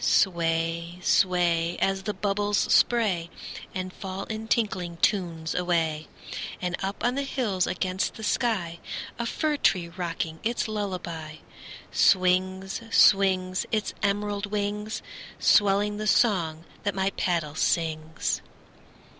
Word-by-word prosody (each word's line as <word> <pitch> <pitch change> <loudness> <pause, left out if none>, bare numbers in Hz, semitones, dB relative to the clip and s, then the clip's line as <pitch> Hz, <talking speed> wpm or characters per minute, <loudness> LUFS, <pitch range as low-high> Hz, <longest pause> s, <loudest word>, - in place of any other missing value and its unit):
Sway, 170 -1 +1
sway, 175 -2 +2
As 195 0 +1
the 210 +2 -3
bubbles 205 0 0
spray 195 -8 +3 0.5
And 185 0 -4
fall 190 0 -5
in 220 +1 -5
tinkling 185 -7 0
tunes 165 -5 0
away. 165 -3 0 0.5
And 180 -1 -1
up 195 +3 -3
on 245 +1 +2
the 280 - -1
hills 225 -9 0
against 185 +1 -1
the 220 - -9
sky, 205 -8 0 0.4
A 235 - -1
fir 305 +4 0
tree 175 -10 +2
rocking 165 -2 -4
its 235 +1 -1
lullaby, 180 -7 -4 0.6
Swings, 185 +1 +2
swings, 190 -4 +4
Its 215 -2 0
emerald 205 0 0
wings, 210 +1 -3 0.3
Swelling 205 0 +3
the 215 0 -3
song 175 -7 +2 0.2
that 205 -2 -1
my 190 0 +1
paddle 170 -6 -1
sings. 160 0 -1
190 Hz, 120 wpm, -26 LUFS, 170-205 Hz, 0.6 s, swings